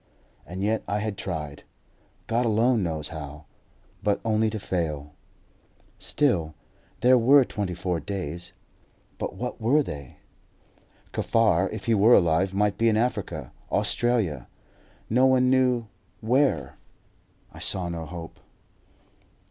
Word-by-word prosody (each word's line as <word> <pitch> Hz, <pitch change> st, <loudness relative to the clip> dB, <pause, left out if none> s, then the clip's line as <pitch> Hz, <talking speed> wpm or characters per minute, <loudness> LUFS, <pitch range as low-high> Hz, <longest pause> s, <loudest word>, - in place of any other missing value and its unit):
And 90 Hz, +4 st, -5 dB
yet 110 Hz, +2 st, +1 dB
I 100 Hz, -, 0 dB
had 105 Hz, -1 st, -2 dB
tried, 75 Hz, -7 st, -5 dB, 0.6 s
God 115 Hz, +2 st, +1 dB
alone 115 Hz, +1 st, +3 dB
knows 80 Hz, -4 st, -2 dB
how; 75 Hz, -1 st, -8 dB, 0.6 s
but 105 Hz, -1 st, +1 dB
only 110 Hz, 0 st, +2 dB
to 110 Hz, -, -4 dB
fail. 75 Hz, -7 st, -3 dB, 0.9 s
Still, 90 Hz, -, 0 dB, 0.5 s
there 125 Hz, 0 st, +6 dB
were 135 Hz, +3 st, +6 dB
twenty 100 Hz, -6 st, -3 dB
four 90 Hz, -1 st, -2 dB
days; 90 Hz, -3 st, -5 dB, 0.7 s
but -, -, -4 dB
what 125 Hz, 0 st, -5 dB
were 140 Hz, +7 st, +3 dB
they? 70 Hz, -, -8 dB, 1.0 s
Kaffar, 100 Hz, -5 st, +2 dB
if 110 Hz, -, -6 dB
he 115 Hz, -, +2 dB
were 110 Hz, +3 st, +6 dB
alive, 85 Hz, +2 st, +3 dB
might 100 Hz, 0 st, 0 dB
be 115 Hz, 0 st, +4 dB
in 110 Hz, -, +2 dB
Africa, 105 Hz, -, -2 dB, 0.2 s
Australia 110 Hz, -, 0 dB, 0.6 s
no 125 Hz, +4 st, +4 dB
one 130 Hz, -1 st, +4 dB
knew 125 Hz, -3 st, +3 dB, 0.3 s
where. 115 Hz, -, +1 dB, 0.8 s
I -, -, -11 dB
saw 90 Hz, -2 st, -1 dB
no 85 Hz, -1 st, -4 dB
hope. 85 Hz, 0 st, -9 dB
100 Hz, 125 wpm, -26 LUFS, 85-115 Hz, 1.0 s, there